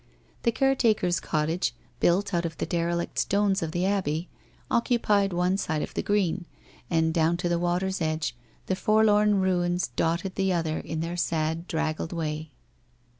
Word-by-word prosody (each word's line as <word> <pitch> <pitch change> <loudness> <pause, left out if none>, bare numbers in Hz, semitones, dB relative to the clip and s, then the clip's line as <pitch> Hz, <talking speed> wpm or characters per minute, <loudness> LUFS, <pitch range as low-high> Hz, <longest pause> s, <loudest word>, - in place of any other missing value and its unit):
The 235 - +2
caretaker's 225 -8 +2
cottage, 155 -5 -1 0.2
built 195 +3 +2
out 170 -1 +1
of 165 -2 -4
the - - -2
derelict 170 0 -1
stones 200 -1 +2
of 160 - -2
the 175 +2 0
abbey, 180 -4 -1 0.4
occupied 215 -5 +2
one 180 +2 +1
side 160 -6 -1
of - - -6
the - - -1
green, 190 -3 0 0.4
and 160 -1 +2
down 165 +1 +2
to 175 0 -1
the 170 0 +1
water's 180 +2 0
edge, 155 -4 -1 0.3
the 190 - 0
forlorn 210 0 +4
ruins 180 -1 +1
dotted 170 +3 0
the 190 -1 +1
other 160 -2 -1
in 160 0 -4
their 170 +2 -3
sad 160 0 -1
draggled 160 +1 -2
way. 155 -2 -3
175 Hz, 160 wpm, -27 LUFS, 160-195 Hz, 0.4 s, forlorn